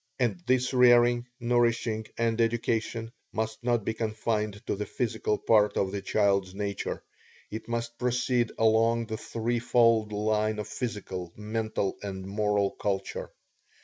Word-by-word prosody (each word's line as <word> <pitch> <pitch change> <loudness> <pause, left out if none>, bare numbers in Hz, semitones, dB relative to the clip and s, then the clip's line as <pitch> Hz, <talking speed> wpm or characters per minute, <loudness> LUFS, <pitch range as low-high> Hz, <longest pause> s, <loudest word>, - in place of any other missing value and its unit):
And 115 -8 0
this 125 0 +2
rearing, 120 -1 +5
nourishing, 115 -2 +1
and 115 0 +1
education 115 0 0 0.2
must 110 +1 -3
not 120 -3 +1
be 110 - 0
confined 110 -2 -2
to - - -1
the 105 +1 -4
physical 110 -3 -1
part 105 -2 +3
of 95 -1 +1
the 100 0 -3
child's 100 -3 +1
nature 100 -1 -3 0.5
it 110 +1 -6
must 115 0 -3
proceed 125 -1 +1
along 115 +1 +3
the 110 -1 -4
three 115 +2 -2
fold 115 -3 +3
line 105 +1 0
of 105 -1 -4
physical, 100 -7 -5
mental, 110 -1 -2
and 95 -2 -5
moral 100 0 +1
culture. 95 -1 -3
110 Hz, 140 wpm, -28 LUFS, 105-120 Hz, 0.5 s, rearing